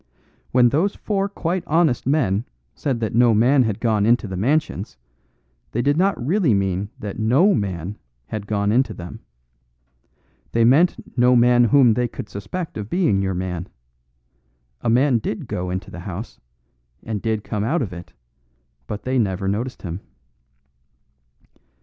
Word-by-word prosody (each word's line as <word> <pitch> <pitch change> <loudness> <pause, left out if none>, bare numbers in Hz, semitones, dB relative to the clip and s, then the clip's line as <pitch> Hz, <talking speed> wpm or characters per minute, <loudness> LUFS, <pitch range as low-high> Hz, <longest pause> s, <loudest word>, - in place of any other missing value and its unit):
When 125 -1 +5
those 170 +11 +1
four 200 -1 -1
quite 180 -2 -2
honest 155 -6 +2
men 115 -8 +1 0.3
said 130 -5 -2
that 110 - -2
no 120 -1 +4
man 130 +6 +4
had 110 -5 0
gone 110 -3 +1
into 115 +1 +3
the 95 - -5
Mansions, 120 - -1 0.8
they 120 - 0
did 145 +2 +2
not 190 +4 +2
really 150 - +2
mean 95 0 -1
that 105 0 -6
no 135 - +4
man 95 -2 -3 0.3
had 105 - -6
gone 100 -1 0
into 120 -1 +1
them. 85 0 -8 1.3
They 115 0 +4
meant 155 +9 +2
no 125 0 +4
man 120 0 +5
whom 120 0 +5
they 125 +2 0
could 105 - -8
suspect 105 - -6
of 105 0 -6
being 160 - +2
your 95 -1 -1
man. 90 -1 -4 1.1
A - - 0
man 125 +1 +3
did 110 - -4
go 90 0 -3
into 95 +1 -4
the 90 - -8
house, 95 +5 -7 0.6
and 110 -3 -4
did 110 -2 -1
come 105 -2 -3
out 145 +6 +1
of 95 -6 -6
it, 85 0 -10 0.8
but 105 - -5
they 130 0 0
never 95 -3 -1
noticed 115 +6 -3
him." 90 -1 -4
115 Hz, 155 wpm, -22 LUFS, 100-135 Hz, 1.3 s, When